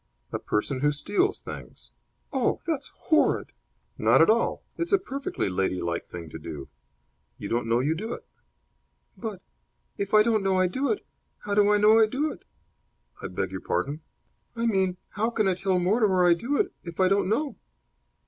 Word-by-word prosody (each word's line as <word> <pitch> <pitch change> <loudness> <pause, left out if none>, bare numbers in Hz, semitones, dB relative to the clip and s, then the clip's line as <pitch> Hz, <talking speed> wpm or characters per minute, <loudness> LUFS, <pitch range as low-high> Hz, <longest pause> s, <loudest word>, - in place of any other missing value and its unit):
"A - - -2
person 130 +6 -1
who 145 +2 +3
steals 205 - 0
things." - - -9 0.4
"Oh, 260 -3 +1
that's 310 -5 -2 0.2
horrid." 315 - +3 0.5
"Not - - +5
at - - +7
all. - - 0
It's 340 - -3
a 400 - +6
perfectly 280 -7 -3
ladylike 90 -3 -1
thing 85 -2 -8
to - - -7
do. 70 -3 -7 0.7
You - - -6
don't 115 0 0
know 115 +2 +2
you 145 +4 +1
do 220 +8 -5
it." - - -9 0.9
"But, 215 -5 -6 0.6
if 200 +1 0
I 215 - +8
don't 220 -2 +2
know 195 -1 +1
I 185 - +4
do 260 +10 0
it, 425 - -3 0.4
how 205 - -1
do 205 0 +5
I 210 - +5
know 215 +2 +6
I 220 - +6
do 285 +7 -1
it?" - - -12 0.8
"I - - -4
beg 95 0 -3
your 95 - -5
pardon?" 140 - -2 0.5
"I 230 0 -1
mean, 190 -5 +1
how 220 +3 -1
can 215 -4 +1
I 190 - +3
tell 185 0 0
Mortimer 190 0 +3
I 175 - +7
do 240 +12 -1
it 395 -1 0
if 170 0 -9
I 185 - +5
don't 195 0 +2
know?" 285 +7 0
195 Hz, 185 wpm, -26 LUFS, 150-235 Hz, 0.9 s, I